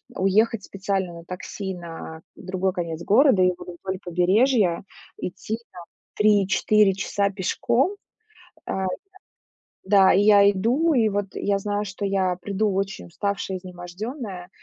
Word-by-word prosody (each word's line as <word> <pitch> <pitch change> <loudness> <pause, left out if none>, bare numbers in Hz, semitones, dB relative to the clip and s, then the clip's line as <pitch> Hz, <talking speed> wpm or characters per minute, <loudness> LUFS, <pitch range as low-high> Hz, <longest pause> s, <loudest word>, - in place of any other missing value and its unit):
уехать 205 +2 +2
специально 195 -2 -3
на 170 - -10
такси 190 +2 -6
на 165 -2 -9
другой 190 0 -2
конец 170 -2 -4
города 240 -2 +5
или 180 0 +4
вот 175 -1 -10
вдоль 190 0 -4
побережья, 185 +2 +2 0.3
идти 195 +5 -4
там 175 -2 -11 0.3
3-4 210 0 +3
часа 200 +1 -1
пешком. 240 - 0 0.7
А, 190 0 -2 1.0
да, 190 -1 +5
и 195 - +4
я 205 -1 +6
иду, 250 - +1
и 225 -4 +3
вот 205 0 -1
я 200 -1 0
знаю, 205 +1 -2
что 195 +1 -5
я 190 -2 0
приду 200 +2 0
очень 195 -1 -3
уставшая, 195 +1 -3
изнемождённая, 185 - -7
195 Hz, 130 wpm, -24 LUFS, 180-210 Hz, 1.0 s, я